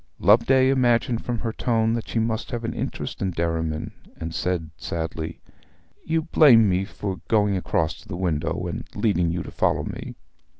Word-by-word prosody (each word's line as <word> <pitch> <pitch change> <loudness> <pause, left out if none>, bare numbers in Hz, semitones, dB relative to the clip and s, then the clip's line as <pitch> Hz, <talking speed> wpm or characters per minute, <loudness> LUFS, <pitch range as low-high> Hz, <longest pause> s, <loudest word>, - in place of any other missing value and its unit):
Loveday 120 +7 +5
imagined 120 -3 +2
from 120 -1 -2
her 115 0 -3
tone 115 -2 +1
that 115 -1 -3
she - - -3
must 110 0 -1
have 120 -1 -4
an 115 - -2
interest - - -4
in 95 - +1
Derriman, 80 -2 -2 0.3
and 80 0 -5
said 85 -3 -2
sadly, 80 0 -5 0.6
'You 160 0 0
blame 135 -9 +6
me 95 0 +1
for 95 -2 -5
going 105 -3 +3
across 80 -3 0
to - - -18
the 95 - -5
window, 85 -3 -1
and - - -4
leading 90 -6 +1
you 85 0 -2
to - - -9
follow - - +1
me.' - - -6
100 Hz, 175 wpm, -24 LUFS, 85-115 Hz, 0.6 s, blame